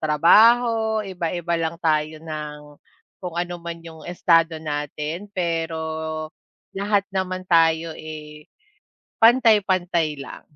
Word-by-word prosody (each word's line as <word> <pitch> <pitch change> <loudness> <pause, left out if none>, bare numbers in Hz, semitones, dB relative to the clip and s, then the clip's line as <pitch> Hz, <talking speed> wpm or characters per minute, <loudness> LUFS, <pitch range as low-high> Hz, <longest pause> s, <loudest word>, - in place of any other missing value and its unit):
trabaho, 220 +8 +4
iba-iba 175 -2 -3
lang 165 +1 -2
tayo 155 0 0
ng 150 -2 -6 0.6
kung 180 -2 -5
ano 175 0 -3
man 170 0 -6
yung 160 -1 -11
estado 165 -2 +2
natin, 150 +4 -4
pero 165 -2 -2 1.0
lahat 200 0 +1
naman 185 -1 -2
tayo, 165 -1 +3
eh, 150 -1 -10 0.8
pantay-pantay 190 - +3
lang. 140 - -9
170 Hz, 100 wpm, -22 LUFS, 155-190 Hz, 1.0 s, trabaho